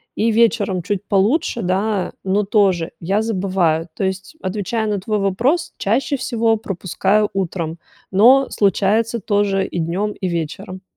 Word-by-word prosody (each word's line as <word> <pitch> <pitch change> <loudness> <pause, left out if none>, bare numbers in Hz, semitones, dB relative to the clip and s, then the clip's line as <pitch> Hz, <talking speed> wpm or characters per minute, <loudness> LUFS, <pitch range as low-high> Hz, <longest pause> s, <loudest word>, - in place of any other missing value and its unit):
И 225 +1 +1
вечером 215 -5 +2
чуть 205 +2 -2
получше, 230 - +1
да, 195 +2 -1
но 195 +2 +1
тоже 195 -5 +2
я 195 +5 0
забываю. 185 -6 0
То - - -3
есть, 190 +10 -4
отвечая 215 +3 -2
на 205 -2 -1
твой 210 +2 -1
вопрос, 245 - 0
чаще 255 +8 0
всего 230 -3 +1
пропускаю 195 +1 0
утром, 170 -3 -3 0.3
но 250 +8 +6
случается 215 +3 +1
тоже 200 -1 +1
и 175 - -4
днем, 185 +6 -1
и 185 - -4
вечером. 185 +4 -5
200 Hz, 140 wpm, -19 LUFS, 185-220 Hz, 0.3 s, но